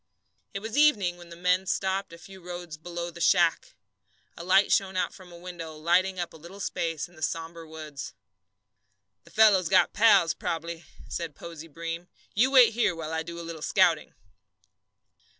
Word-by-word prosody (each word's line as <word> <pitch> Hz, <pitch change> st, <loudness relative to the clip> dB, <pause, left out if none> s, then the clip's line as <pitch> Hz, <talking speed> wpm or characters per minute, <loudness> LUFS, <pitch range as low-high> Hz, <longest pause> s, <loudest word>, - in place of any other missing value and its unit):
It 195 Hz, -, -3 dB
was 220 Hz, +2 st, -5 dB
evening 210 Hz, -13 st, +3 dB
when 175 Hz, -1 st, -13 dB
the 170 Hz, -, -10 dB
men 180 Hz, +2 st, +1 dB
stopped 190 Hz, +1 st, -1 dB
a 170 Hz, -, -11 dB
few 190 Hz, +2 st, -13 dB
rods 175 Hz, -2 st, -7 dB
below 170 Hz, +2 st, -6 dB
the 170 Hz, -, -11 dB
shack. 170 Hz, -1 st, +3 dB, 0.6 s
A 170 Hz, -, -8 dB
light 190 Hz, +3 st, +4 dB
shone 190 Hz, -3 st, +2 dB
out 185 Hz, -, 0 dB
from 185 Hz, -2 st, -14 dB
a 170 Hz, -, -11 dB
window, 170 Hz, -3 st, -8 dB
lighting 180 Hz, +4 st, +1 dB
up 175 Hz, -, -4 dB
a -, -, -11 dB
little 170 Hz, +5 st, -12 dB
space 165 Hz, -5 st, -2 dB
in 175 Hz, -, -21 dB
the 155 Hz, -, -15 dB
sombre 165 Hz, +1 st, -4 dB
woods. 155 Hz, -3 st, -8 dB, 1.1 s
"The -, -, -16 dB
fellow's 200 Hz, -6 st, +5 dB
got 190 Hz, -, +4 dB
pals 200 Hz, -6 st, +5 dB
prob'bly," 165 Hz, 0 st, -4 dB, 0.2 s
said 165 Hz, -4 st, -5 dB
Posey 165 Hz, -1 st, -9 dB
Breem. 165 Hz, +3 st, -6 dB, 0.3 s
"You 245 Hz, +6 st, +3 dB
wait 255 Hz, -4 st, +7 dB
here 215 Hz, -6 st, +1 dB
while 160 Hz, -1 st, -5 dB
I 160 Hz, -, 0 dB
do 170 Hz, +1 st, -7 dB
a 170 Hz, -, -7 dB
little 165 Hz, -2 st, -7 dB
scouting." -, -, +2 dB
175 Hz, 180 wpm, -27 LUFS, 165-190 Hz, 1.1 s, wait